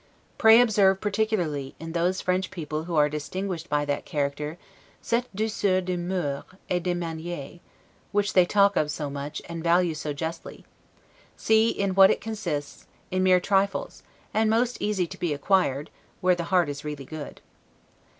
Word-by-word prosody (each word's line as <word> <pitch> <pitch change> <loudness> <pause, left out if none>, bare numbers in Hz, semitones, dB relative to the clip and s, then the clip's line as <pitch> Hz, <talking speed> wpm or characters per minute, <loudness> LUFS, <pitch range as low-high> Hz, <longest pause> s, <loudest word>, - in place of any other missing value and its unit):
Pray 225 0 +8
observe 200 -5 +4
particularly, 195 -10 -1
in 165 +1 -6
those 175 +3 0
French 185 +1 0
people 155 -2 -5
who 170 -1 -3
are 150 -1 +5
distinguished 170 +4 -4
by 145 0 +1
that 145 0 -2
character, 150 +2 -3 0.4
'cette 240 +2 -1
douceur 205 -3 +1
de 185 0 -2
moeurs 175 -5 -2 0.3
et 180 -1 +1
de 180 0 -1
manieres', 165 -2 -5 0.5
which 205 0 +1
they 185 - +6
talk 200 +2 +3
of 150 - +1
so 145 -1 -3
much, 140 +1 -5
and 165 -1 -6
value 170 0 +3
so 155 -1 -4
justly; 160 +3 -6 0.7
see 220 +1 +3
in 200 -3 -1
what 195 0 +7
it - - +1
consists; 170 -10 -5 0.2
in 185 0 +1
mere 185 -1 +5
trifles, 195 +1 0 0.3
and 220 0 +2
most 235 +2 +2
easy 205 -4 0
to - - -10
be 165 -4 0
acquired, 150 -4 +1 0.3
where 185 0 +3
the 175 -1 -3
heart 180 -2 +2
is 145 0 -5
really 150 -2 -6
good. 155 +1 -8
175 Hz, 165 wpm, -26 LUFS, 150-195 Hz, 0.7 s, Pray